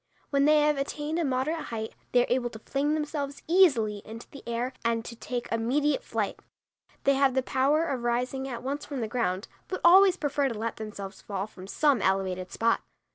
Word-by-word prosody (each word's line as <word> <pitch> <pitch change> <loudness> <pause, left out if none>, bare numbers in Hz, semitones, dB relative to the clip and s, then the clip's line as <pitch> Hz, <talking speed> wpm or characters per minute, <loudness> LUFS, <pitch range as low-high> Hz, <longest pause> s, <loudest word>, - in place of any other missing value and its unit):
When 280 0 +3
they 305 0 +5
have 300 -1 +3
attained 295 +3 -2
a - - +1
moderate 275 +4 -1
height, 220 -1 -5 0.2
they 245 -1 +5
are 245 - +1
able 245 -1 0
to 225 - -9
fling 280 +6 -1
themselves 295 -2 -3
easily 265 - +4
into 225 +2 -9
the 280 - -10
air 240 +2 -2
and 230 0 0
to 235 - -7
take 245 +1 -4
immediate 280 - +1
flight. - - -2 0.6
They 275 - +4
have 270 -1 +3
the 265 - +2
power 280 +5 +2
of 270 -6 -2
rising 250 +3 -1
at 245 -3 -6
once 280 +3 -3
from 280 -4 -5
the 225 - -1
ground, 210 -4 -1 0.2
but 370 - -3
always 375 +1 +7
prefer 285 -2 0
to 230 - -5
let 225 +1 -3
themselves 205 -2 -7
fall 195 -1 -3
from 190 -3 -12
some 280 +1 +2
elevated 190 -1 0
spot. 230 0 +1
260 Hz, 200 wpm, -28 LUFS, 225-290 Hz, 0.6 s, always